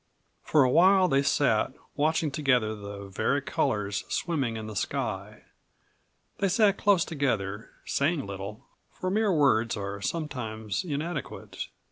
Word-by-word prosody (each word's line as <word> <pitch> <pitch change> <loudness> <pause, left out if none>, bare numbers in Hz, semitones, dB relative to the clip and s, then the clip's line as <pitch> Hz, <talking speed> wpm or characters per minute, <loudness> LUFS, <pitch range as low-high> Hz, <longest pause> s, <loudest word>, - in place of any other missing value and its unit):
For 150 - +4
a 130 - +3
while 185 +4 +6
they 140 -4 +3
sat, 130 -4 +2 0.2
watching 155 +1 +1
together 125 -7 +2
the 100 -1 -8
vari 95 - 0
colors 100 -1 -1
swimming 135 -10 -1
in 110 - -5
the 110 -1 -7
sky. - - -3 1.0
They 195 - +2
sat 200 0 +3
close 200 -5 +4
together, 110 - -2 0.2
saying 145 +1 0
little, 100 +2 -7 0.2
for 185 - -4
mere 215 0 +2
words 120 -9 +3
are 100 0 -5
sometimes 110 - -3
inadequate. 155 -1 -4
135 Hz, 130 wpm, -28 LUFS, 110-165 Hz, 1.0 s, while